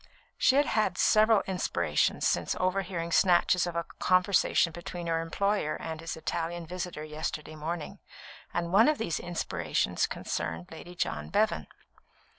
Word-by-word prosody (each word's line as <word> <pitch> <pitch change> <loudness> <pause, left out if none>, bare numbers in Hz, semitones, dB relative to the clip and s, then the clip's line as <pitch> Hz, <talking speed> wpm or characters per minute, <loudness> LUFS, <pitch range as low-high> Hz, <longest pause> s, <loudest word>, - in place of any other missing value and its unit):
She 260 - +4
had 290 +1 +4
had 215 -4 0
several 215 -1 +5
inspirations 190 -1 0
since - - 0
overhearing 185 -2 -1
snatches 180 0 +4
of 175 - -5 0.2
conversation 185 -2 +3
between 175 +1 -7
her 165 -1 0
employer 200 0 0
and 160 -1 -6
his 165 - -5
Italian 170 +1 -3
visitor 180 -2 -5
yesterday 155 0 -5
morning, 155 +1 -5 0.5
and 170 0 -2
one 220 +4 +7
of 305 -1 +3
these 170 -8 -2
inspirations 175 -1 -1
concerned 80 +1 -4
Lady 175 +2 -10
John - - -2
Bevan. 210 +2 +1
175 Hz, 135 wpm, -29 LUFS, 165-195 Hz, 0.5 s, one